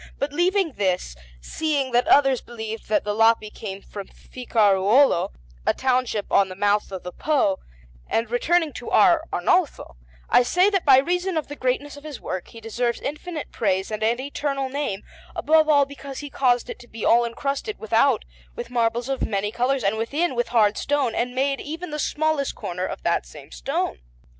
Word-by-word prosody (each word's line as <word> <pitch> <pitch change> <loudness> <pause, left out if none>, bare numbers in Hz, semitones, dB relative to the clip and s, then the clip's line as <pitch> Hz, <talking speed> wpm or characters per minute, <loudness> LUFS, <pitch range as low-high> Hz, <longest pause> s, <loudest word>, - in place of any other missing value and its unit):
But 285 +1 -3
leaving 365 +1 +2
this, 185 - -1 0.3
seeing 285 - -1
that 245 +1 +2
others 270 -3 +4
believe 225 -2 -7
that 215 - +1
the 210 - -2
Lapi 225 0 +3
came 195 -2 -7
from 200 -2 -8
Ficaruolo, 220 -1 +2 0.3
a - - +1
township 250 -5 0
on 195 -1 +4
the 185 - -8
mouth 205 +1 +1
of 190 -2 -6
the 180 - -6
Po, 265 - +1 0.5
and 230 +1 0
returning 320 +5 +1
to - - -7
our - - +5
Arnolfo, 305 - 0 0.3
I - - +5
say 360 +11 +3
that 390 -3 0
by 270 -3 +7
reason 355 +5 0
of 310 - -3
the 290 - -6
greatness 285 +2 -2
of - - -11
this 300 -3 -8
work 185 -1 -5
he 230 - -12
deserves 235 +2 -2
infinite 305 +2 -5
praise 190 -2 -1
and 215 - -4
an 230 +3 +1
eternal 275 0 -3
name, 275 -8 -3 0.3
above 315 0 +3
all 285 -2 +5
because 275 -1 -9
he 290 -1 -7
caused 245 -3 +2
it - - -7
to 240 - -14
be 225 -2 -6
all 235 +1 +5
incrusted, 275 - -3
without, 220 - +2 0.3
with - - -7
marbles 235 0 0
of 270 -1 -2
many 205 0 -1
colours, 250 +2 0
and 200 +2 +1
within, 285 +9 -1
with 240 -1 -1
hard 215 -3 +2
stone, 280 -4 0
and 245 +1 -2
made 275 +1 0
even 320 +3 -6
the 300 - -4
smallest 305 -2 0
corners 180 +1 -4
of - - -8
that - - 0
same - - -13
stone. - - -3
250 Hz, 185 wpm, -23 LUFS, 215-290 Hz, 0.5 s, by